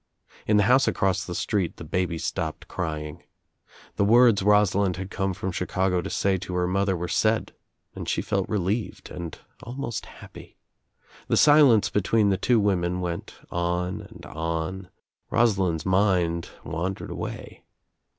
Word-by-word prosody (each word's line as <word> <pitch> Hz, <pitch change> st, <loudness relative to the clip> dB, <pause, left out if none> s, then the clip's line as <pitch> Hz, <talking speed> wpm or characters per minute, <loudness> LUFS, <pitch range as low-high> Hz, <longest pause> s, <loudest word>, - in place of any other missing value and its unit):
In 105 Hz, -, +4 dB
the 105 Hz, -, +5 dB
house 125 Hz, +6 st, +4 dB
across 95 Hz, -2 st, +1 dB
the 90 Hz, -, -6 dB
street 100 Hz, -4 st, -1 dB
the -, -, -8 dB
baby 85 Hz, +1 st, -1 dB
stopped 80 Hz, -1 st, -4 dB
crying. 80 Hz, -1 st, -4 dB, 0.8 s
The -, -, +3 dB
words 115 Hz, 0 st, +5 dB
Rosalind 100 Hz, -2 st, +3 dB
had 95 Hz, +1 st, -6 dB
come 95 Hz, -2 st, -1 dB
from 95 Hz, 0 st, -3 dB
Chicago 90 Hz, 0 st, 0 dB
to -, -, -5 dB
say 95 Hz, -1 st, +1 dB
to 90 Hz, 0 st, -6 dB
her 90 Hz, 0 st, +1 dB
mother 95 Hz, 0 st, +1 dB
were 90 Hz, +1 st, -3 dB
said 110 Hz, +4 st, +1 dB, 0.4 s
and -, -, -6 dB
she -, -, 0 dB
felt -, -, -1 dB
relieved 105 Hz, +3 st, -2 dB
and 85 Hz, -3 st, -6 dB, 0.3 s
al 120 Hz, -, -7 dB
most 130 Hz, -4 st, -4 dB
happy. -, -, -13 dB, 0.7 s
The -, -, +2 dB
silence 145 Hz, -8 st, +6 dB
between 105 Hz, +1 st, +2 dB
the 95 Hz, -, +2 dB
two 120 Hz, +2 st, +2 dB
women 90 Hz, -3 st, +1 dB
went 85 Hz, -1 st, -4 dB, 0.2 s
on 90 Hz, +1 st, -1 dB
and -, -, -13 dB
on. 80 Hz, +4 st, -4 dB, 0.4 s
Rosalind's 95 Hz, -8 st, +1 dB
mind 90 Hz, -3 st, +1 dB
wandered 90 Hz, +4 st, -4 dB
away. -, -, -7 dB
95 Hz, 150 wpm, -25 LUFS, 85-105 Hz, 0.8 s, silence